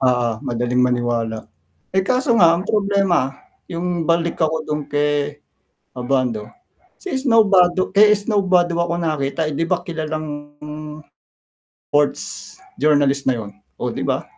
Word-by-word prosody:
Oo, 120 -3 +1
madaling 120 +1 -1
maniwala. 120 -3 0 0.5
Eh, 190 - +3
kaso 255 0 +2
nga 170 -1 +6
ang 185 - -4
problema, 195 -9 +1 0.4
'yong 175 -1 -3
balik 170 0 +1
ako 160 0 0
dun 150 0 -2
kay 145 0 0 0.6
Abando, 125 -4 -1 0.5
si 370 -8 -3
Snow 235 -4 +4
Badu 185 -1 +4
kay 210 +2 +6
Snow 205 -1 0
Badua 175 -2 +2
ko 170 - -2
nakita, 155 -1 -1
eh, - - -3
'di 165 - 0
ba 180 0 0
kilalang 155 -3 -5 1.4
ports 145 0 0 0.3
journalist 140 -2 +2
na 125 - +1
'yon, 105 -3 -7 0.3
oh, - - -2
'di - - -5
ba? - - 0
155 Hz, 140 wpm, -20 LUFS, 135-180 Hz, 1.4 s, nga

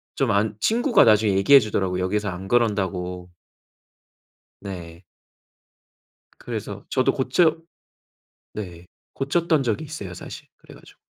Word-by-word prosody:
좀 135 -4 +1
안 105 +1 +1
친구가 240 +3 +3
나중에 105 -2 +4
얘기해 100 +9 +7
주더라고 95 -5 -2
여기에서 105 +2 -1
안 90 +1 -7
그런다고. 95 -6 -1 1.3
네. 90 -3 -9 1.3
그래서 - - -7
저도 - - +2
고쳐 155 +6 +2 1.0
네, 90 -4 -8 0.3
고쳤던 155 +2 +1
적이 120 +4 -2
있어요 140 - -7
사실 90 - -10
그래 - - -16
가지고. - - -18
105 Hz, 260 characters per minute, -23 LUFS, 90-135 Hz, 1.3 s, 얘기해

